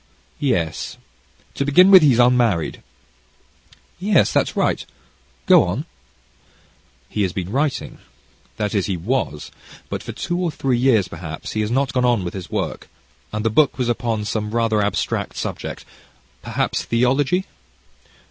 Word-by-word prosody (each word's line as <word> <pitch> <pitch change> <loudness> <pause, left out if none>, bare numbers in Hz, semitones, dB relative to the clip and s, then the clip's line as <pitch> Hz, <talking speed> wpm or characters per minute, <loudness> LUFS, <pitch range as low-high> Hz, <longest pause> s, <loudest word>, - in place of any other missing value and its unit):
"Yes, 90 - -1 0.6
to - - -1
begin 180 +8 +6
with, 190 -2 +10
he's 140 -6 +4
unmarried." 120 -8 +2 1.2
"Yes, 195 -1 +3
that's - - +1
right - - 0 0.6
go - - +7
on." 95 - -3 1.2
"He 105 - -3
has 95 -3 0
been 95 0 -4
writing, 140 +3 -2 0.6
that 105 -2 -2
is 100 -3 0
he 95 -3 -1
was, 80 - -2 0.4
but - - -4
for - - -7
two 175 +1 -3
or 180 -2 0
three 130 -5 -1
years 115 -7 +3
perhaps, 80 -2 -7
he 110 - -1
has 105 - -1
not 130 +1 0
gone 125 - +1
on 120 -5 +2
with 85 - -5
his 95 -3 -7
work, - - -3 0.4
and 105 +1 -3
the 115 - +2
book 145 +3 +3
was 125 -2 -1
upon 115 -3 -1
some 105 0 -2
rather 115 -2 +2
abstract 100 0 -2
subject - - -5 0.6
perhaps - - -2
theology." 135 +10 +1
120 Hz, 150 wpm, -21 LUFS, 105-135 Hz, 1.2 s, with